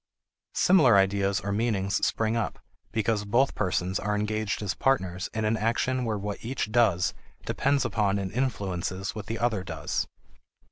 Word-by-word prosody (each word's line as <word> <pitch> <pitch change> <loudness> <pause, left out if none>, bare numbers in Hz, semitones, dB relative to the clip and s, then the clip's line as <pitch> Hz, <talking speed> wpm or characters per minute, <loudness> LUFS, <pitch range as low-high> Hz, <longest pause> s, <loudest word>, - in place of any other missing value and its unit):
Similar 155 - +6
ideas 100 0 +2
or 100 - -3
meanings 100 -2 0
spring 110 0 +1
up 115 - -1 0.3
because 110 -1 0
both 120 +7 +2
persons 90 -1 -1
are 105 +1 -1
engaged 105 0 -1
as 95 - -1
partners 95 -9 0
in 110 0 -2
an 110 +1 +2
action 120 +3 0
where 110 -2 -1
what 100 0 -5
each 115 -2 -3
does 105 -7 +3 0.3
depends 140 -1 +1
upon 100 -3 +1
and 95 -2 -3
influences 95 -7 -2
what 105 -1 -7
the 115 +1 -3
other 110 -5 0
does. - - -3
105 Hz, 155 wpm, -27 LUFS, 95-115 Hz, 0.3 s, Similar